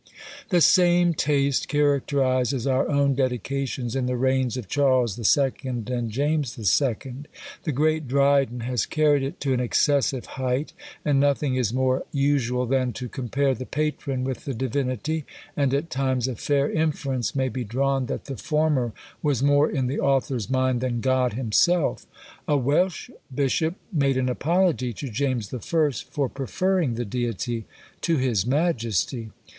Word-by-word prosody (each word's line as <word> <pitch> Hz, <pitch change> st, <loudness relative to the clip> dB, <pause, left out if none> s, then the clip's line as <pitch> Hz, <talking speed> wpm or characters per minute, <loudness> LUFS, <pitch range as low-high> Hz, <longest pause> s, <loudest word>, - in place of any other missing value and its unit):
The 175 Hz, -3 st, +3 dB
same 175 Hz, +1 st, +5 dB
taste 140 Hz, -2 st, +1 dB
characterises 140 Hz, -3 st, +1 dB
our 135 Hz, +2 st, +1 dB
own 140 Hz, -2 st, +2 dB
dedications 130 Hz, -1 st, -2 dB
in 130 Hz, -2 st, 0 dB
the 125 Hz, 0 st, -1 dB
reigns 130 Hz, -1 st, +1 dB
of 120 Hz, -6 st, -6 dB
Charles 130 Hz, -5 st, +2 dB
II. 135 Hz, +4 st, +3 dB
and 120 Hz, -2 st, -3 dB
James 145 Hz, +2 st, -1 dB, 0.2 s
II. 130 Hz, -1 st, -2 dB, 0.5 s
The 155 Hz, -, 0 dB
great 155 Hz, +2 st, +1 dB
Dryden 140 Hz, -2 st, +2 dB
has 120 Hz, -2 st, -1 dB
carried 150 Hz, -2 st, +3 dB
it 135 Hz, +1 st, -4 dB
to 135 Hz, -2 st, +1 dB
an 125 Hz, -, 0 dB
excessive 130 Hz, 0 st, +1 dB, 0.2 s
height; 130 Hz, +3 st, -1 dB, 0.3 s
and 145 Hz, -2 st, +3 dB
nothing 140 Hz, -1 st, +2 dB
is 125 Hz, -5 st, 0 dB
more 130 Hz, +1 st, +1 dB
usual 135 Hz, -3 st, +1 dB
than 130 Hz, -1 st, 0 dB
to 125 Hz, -, -5 dB
compare 135 Hz, +2 st, 0 dB
the 130 Hz, +1 st, -7 dB
patron 145 Hz, -3 st, -2 dB
with 130 Hz, -1 st, -4 dB
the 135 Hz, -, -3 dB
Divinity 130 Hz, +5 st, -2 dB, 0.3 s
and 140 Hz, -2 st, +1 dB
at 145 Hz, +4 st, -1 dB
times 130 Hz, -2 st, 0 dB
a 130 Hz, -, -3 dB
fair 140 Hz, +5 st, 0 dB
inference 140 Hz, -7 st, -1 dB
may 130 Hz, -1 st, +1 dB
be 125 Hz, +1 st, -3 dB
drawn 135 Hz, +3 st, 0 dB
that -, -, -4 dB
the 135 Hz, -3 st, -6 dB
former 150 Hz, -7 st, 0 dB, 0.3 s
was 140 Hz, -4 st, 0 dB
more 145 Hz, +1 st, +4 dB
in 135 Hz, -4 st, -1 dB
the 130 Hz, +3 st, -2 dB
author's 135 Hz, -4 st, 0 dB
mind 130 Hz, -2 st, +1 dB
than 120 Hz, -2 st, -1 dB
God 130 Hz, -2 st, +1 dB
himself! 130 Hz, +9 st, +1 dB, 0.4 s
A 145 Hz, -, +3 dB
Welsh 155 Hz, +6 st, 0 dB, 0.2 s
bishop 145 Hz, +5 st, 0 dB, 0.2 s
made 140 Hz, -4 st, +2 dB
an 130 Hz, 0 st, +1 dB
apology 155 Hz, -3 st, +1 dB
to 135 Hz, +5 st, -6 dB
James 125 Hz, -3 st, -2 dB
I. 125 Hz, -, -3 dB
for 145 Hz, -1 st, -1 dB
preferring 140 Hz, -, -1 dB
the 120 Hz, +1 st, -3 dB
Deity 115 Hz, 0 st, -3 dB, 0.4 s
to 165 Hz, -2 st, +1 dB
his 120 Hz, -6 st, 0 dB
Majesty! 120 Hz, -, 0 dB
135 Hz, 155 wpm, -24 LUFS, 125-145 Hz, 0.5 s, same